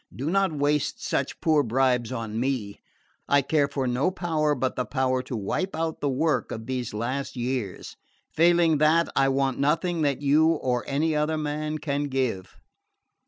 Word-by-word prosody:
"Do 140 +6 -3
not 195 -1 +2
waste 145 -1 -1
such - - -2
poor 155 -2 +3
bribes 125 -1 +1
on 115 -3 -4
me. 120 -6 -2 0.5
I 140 0 +3
care 145 +1 +2
for 140 -1 -3
no 125 +6 +1
power 160 -5 0
but 130 0 -1
the 125 - -1
power 130 -1 0
to 130 -1 -6
wipe 170 - -2
out 160 0 -3
the 145 - +1
work 150 +4 0
of 110 0 -6
these 125 -1 -3
last 125 +7 -3
years. 125 -5 -4 0.4
Failing 170 -2 +4
that, 160 +2 +3
I 135 - +3
want 135 -1 0
nothing 165 +4 +1
that 140 -2 0
you 155 +3 +4
or 125 -6 -1
any 155 +3 0
other 150 +1 0
man 150 0 -3
can 145 -1 -2
give." 130 -9 -2
140 Hz, 170 wpm, -26 LUFS, 130-155 Hz, 0.5 s, Failing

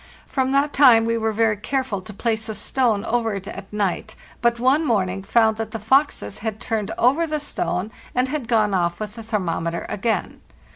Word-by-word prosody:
From 265 -1 -1
that 280 +2 +2
time 245 -5 +6
we 230 0 +1
were 220 -1 0
very 220 0 +2
careful 255 -2 -2
to 210 - -10
place 220 +1 -2
a 220 - -3
stone 230 -6 0
over 225 -2 0
it 195 0 -6
at 195 0 -8
night, 210 +1 -2 0.3
but 235 -1 +2
one 265 +6 +3
morning 195 -8 0
found 220 +2 +3
that 225 -1 -3
the 225 - -4
foxes 225 - +1
had 220 0 -4
turned 220 -4 -2
over 280 +8 +3
the 305 -1 -1
stone, 215 -8 -3 0.2
and 250 +1 +2
had 270 -3 -3
gone 215 -3 +2
off 175 -2 0
with 210 -1 -5
the 230 - -8
thermometer 170 -6 -2
again. 215 +2 -2
225 Hz, 195 wpm, -22 LUFS, 205-250 Hz, 0.3 s, time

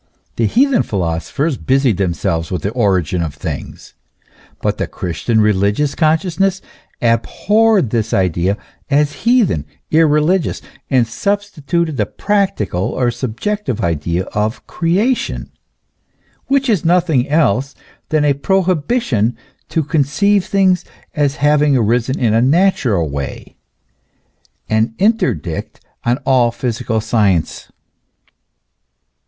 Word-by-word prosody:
The 115 - +1
heathen 265 - +3
philosophers 100 - -2
busied 130 -6 +1
themselves 85 -3 -1
with 90 -5 -3
the 100 - -1
origin 95 -8 +1
of 80 -4 -4
things. - - -7 0.7
But - - -2
the - - -1
Christian 90 +6 -2
religious 105 +7 +2
consciousness 175 +4 +1 0.4
abhorred 195 - +2
this 115 -2 -1
idea 90 +1 +1 0.3
as 150 +1 +2 0.2
heathen, 220 - +3 0.3
irreligious, 160 +3 +2 0.3
and 130 -4 +3
substituted 170 - -2
the 105 -3 0
practical 195 - -1
or 125 -2 0
subjective 130 - -3
idea 85 +2 -1
of 105 +2 -2
Creation, 210 +10 -1 1.0
which 275 0 +1
is 210 -8 +1
nothing 165 -6 +2
else 140 -3 +1 0.3
than 155 -1 +2
a 145 - +4
prohibition 165 - 0 0.3
to 160 - 0
conceive 165 +7 +1
things 190 -2 +2 0.3
as 145 -2 0
having 145 -1 +3
arisen 120 +3 +1
in 115 -4 +2
a 115 - +3
natural 130 - +2
way, 70 -1 -6 1.1
an 110 +1 0
interdict 185 - -1 0.2
on 120 +1 +1
all 125 -3 +3
physical 115 -1 -2
science. 105 -7 0
135 Hz, 110 wpm, -17 LUFS, 105-175 Hz, 1.1 s, a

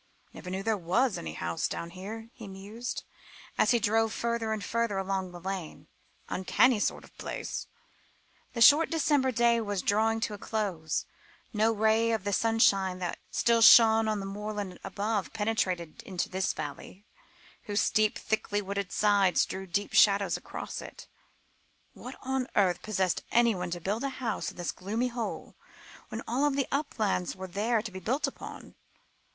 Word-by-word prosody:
"Never 180 - -9
knew 190 +1 -3
there 220 0 +1
was 200 +8 +1
any 80 -1 -6
house 85 0 -2
down 170 - -5
here," 220 +5 -8
he 220 - -10
mused, 205 +5 -6 0.5
as - - +3
he 240 - +5
drove 225 0 +2
further 235 -1 -2
and 215 -2 -2
further 230 0 -1
along 190 -1 -2
the 175 - -9
lane; 185 -2 -6 0.4
"uncanny 215 +5 +3
sort - - -1
of - - -18
place." - - -5 0.9
The 235 - -3
short 295 +7 +7
December 290 -4 +2
day 235 0 +3
was 205 -3 -2
drawing 220 +2 +2
to 215 - -1
a 205 - -7
close. 190 -9 -2 0.5
No 220 +1 +3
ray 220 +1 +2
of 220 -4 -1
the 205 0 -1
sunshine 195 -4 +3
that 180 -1 -4
still 235 -1 +2
shone 225 0 +8
on 215 -1 0
the 195 - -5
moorland 205 -2 -5
above, 205 +1 -2
penetrated 185 -6 -1
into 185 -3 -3
this 190 0 0
valley, 150 +7 -8 0.6
whose 205 0 0
steep, 215 0 +2
thickly 205 -1 -1
wooded 200 -2 -4
sides 200 -3 +3
threw 190 0 -6
deep 200 +3 -2
shadows 200 -1 +5
across - - -6
it. - - -10 0.9
"What - - -9
on 265 -1 -1
earth 180 -3 +3
possessed 190 -4 0
anybody 205 -8 +2
to 175 - -5
build 205 +8 -2
a 275 - 0
house 255 -4 -3
in - - -13
this 175 - -2
gloomy 220 +7 -2
hole, 235 -2 -5 0.5
when 225 - -5
all 270 +6 +2
the 275 -1 -1
uplands 220 - -1
were 190 0 -7
there 210 +4 0
to 220 - -6
be 190 - -7
built 250 - 0
upon?" - - -8
210 Hz, 165 wpm, -29 LUFS, 190-230 Hz, 0.9 s, shone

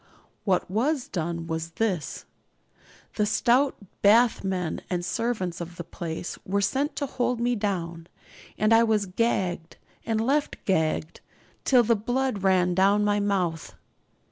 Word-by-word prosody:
What 190 -3 +1
was 250 - 0
done 170 -1 -3
was 165 0 -4
this: 190 -7 -2 0.9
the 210 - +3
stout 255 +5 +3 0.3
bathmen 200 -5 +3
and 175 -1 -2
servants 200 -7 -2
of 170 +1 -7
the 170 - -6
place 170 0 -6
were 200 +2 0
sent 270 +9 0
to 285 - -1
hold 250 -2 -1
me 240 +1 +1
down; 170 -6 -3 0.5
and 215 +2 +3
I 225 - +7
was 215 -3 +2
gagged, 180 -4 -1 0.3
and 225 -1 -1
left 280 +6 +1
gagged, 160 -3 0 0.4
till 250 -3 +5
the 230 +1 +3
blood 245 0 -1
ran 185 -2 +3
down 195 +3 +4
from - - +1
my 205 0 +2
mouth. 185 -6 -1
200 Hz, 145 wpm, -26 LUFS, 175-230 Hz, 0.9 s, I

